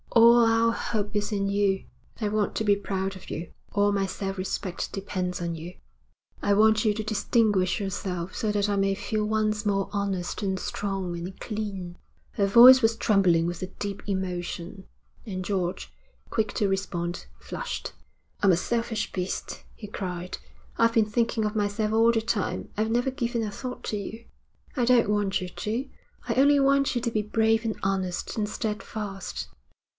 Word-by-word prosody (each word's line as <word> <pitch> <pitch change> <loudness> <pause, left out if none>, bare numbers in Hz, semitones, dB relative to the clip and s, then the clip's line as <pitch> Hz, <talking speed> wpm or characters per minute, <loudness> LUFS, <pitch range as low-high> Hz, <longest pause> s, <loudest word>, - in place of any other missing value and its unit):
All 235 +1 +7
our 225 0 +4
hope 210 -2 -2
is 205 +1 0
in 200 -1 0
you. 200 -1 +1 0.3
I 215 - 0
want 210 -1 0
to - - 0
be 205 -1 +4
proud 195 -1 -3
of 190 - -11
you. 165 +1 -5 0.2
All 205 0 +3
my 195 -1 +1
self 195 0 -4
respect 185 0 -3
depends 185 -2 -3
on 170 -1 -2
you. 170 +3 -8 0.7
I 205 - +2
want 215 +1 +5
you 215 -2 +3
to 215 - -3
distinguish 215 -3 +2
yourself, 185 -2 -3
so 215 - 0
that 205 0 +1
I 205 - +1
may 195 0 +2
feel 215 +1 -2
once 215 0 0
more 195 -2 0
honest 200 -2 -2
and 190 -2 -1
strong 195 -3 -3
and 180 +2 -7
clean.' 195 -5 -5 0.3
Her 200 - +1
voice 250 +5 +9
was 225 0 +3
trembling 190 -7 +3
with 175 0 -3
a 185 - -2
deep 200 +1 -5
emotion, 185 0 -3 0.4
and 185 -4 -4
George, 185 -3 -2 0.4
quick 215 -2 0
to 205 - +2
respond, 180 -3 -2
flushed. - - -5 0.5
'I 205 - +3
am 190 - +7
a - - +3
selfish 230 +2 -1
beast,' 180 0 -4
he 210 - -9
cried. 180 -3 -5 0.4
'I've 230 0 +4
been 225 -2 +5
thinking 225 +1 0
of 210 +1 -2
myself 210 +1 0
all 225 +1 +5
the 225 -1 +1
time. 220 -3 -2
I've 220 +1 0
never 245 +3 +1
given 240 -3 -1
a 210 - -3
thought 250 +5 -6
to 210 - -2
you.' 220 +3 -7 0.5
'I 250 -4 +2
don't 240 -3 +4
want 205 -2 +1
you 185 - -3
to: 230 +8 -3 0.4
I - - +1
only 285 +2 +5
want 275 -1 +3
you 240 - 0
to 235 -1 -1
be 215 - +1
brave 220 +1 +2
and 225 -2 -1
honest 190 -2 -1
and 210 -2 -1
steadfast.' 210 -3 -4
205 Hz, 180 wpm, -27 LUFS, 190-225 Hz, 0.7 s, voice